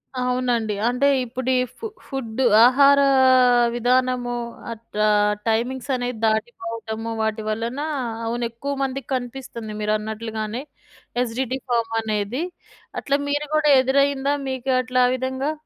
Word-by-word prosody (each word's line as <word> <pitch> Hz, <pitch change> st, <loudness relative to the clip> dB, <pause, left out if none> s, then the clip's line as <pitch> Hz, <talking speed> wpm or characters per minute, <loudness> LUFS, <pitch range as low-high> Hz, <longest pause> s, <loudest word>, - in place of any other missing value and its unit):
అవునండి. 250 Hz, -3 st, 0 dB
అంటే 250 Hz, +3 st, +1 dB, 0.2 s
ఇప్పుడీ 255 Hz, +2 st, -2 dB, 0.3 s
ఫు 455 Hz, -, -6 dB, 0.2 s
ఫుడ్ 260 Hz, -3 st, -4 dB, 0.2 s
ఆహార 280 Hz, +2 st, +6 dB, 0.8 s
విధానము 245 Hz, 0 st, +1 dB, 0.4 s
అట్లా 225 Hz, -2 st, -4 dB, 0.4 s
టైమింగ్స్ 245 Hz, +4 st, -1 dB
అనేవి 245 Hz, 0 st, -3 dB
దాటిపోవటము. 225 Hz, 0 st, -3 dB
వాటి 220 Hz, 0 st, -1 dB
వలన 230 Hz, +5 st, -3 dB, 0.5 s
అవును 235 Hz, +1 st, -2 dB
ఎక్కువ 275 Hz, +5 st, -5 dB
మందికి 270 Hz, -1 st, -4 dB
కనిపిస్తుంది. 245 Hz, -3 st, -6 dB
మీరన్నట్లుగానే 215 Hz, +2 st, -3 dB, 0.6 s
ఎసిడిటీ 250 Hz, +2 st, -2 dB
ప్రాబ్లమ్ 230 Hz, -2 st, 0 dB
అనేది 215 Hz, +6 st, -2 dB, 0.6 s
అట్లా 280 Hz, 0 st, 0 dB
మీరు 290 Hz, +1 st, -1 dB
గూడా 305 Hz, -1 st, +3 dB
ఎదురైదా? 275 Hz, +1 st, +2 dB, 0.2 s
మీకు 260 Hz, 0 st, -2 dB
అట్లా 255 Hz, 0 st, 0 dB
ఆ 250 Hz, -, +1 dB
విధంగా? 260 Hz, +3 st, -2 dB
245 Hz, 110 wpm, -22 LUFS, 225-260 Hz, 0.8 s, ఆహార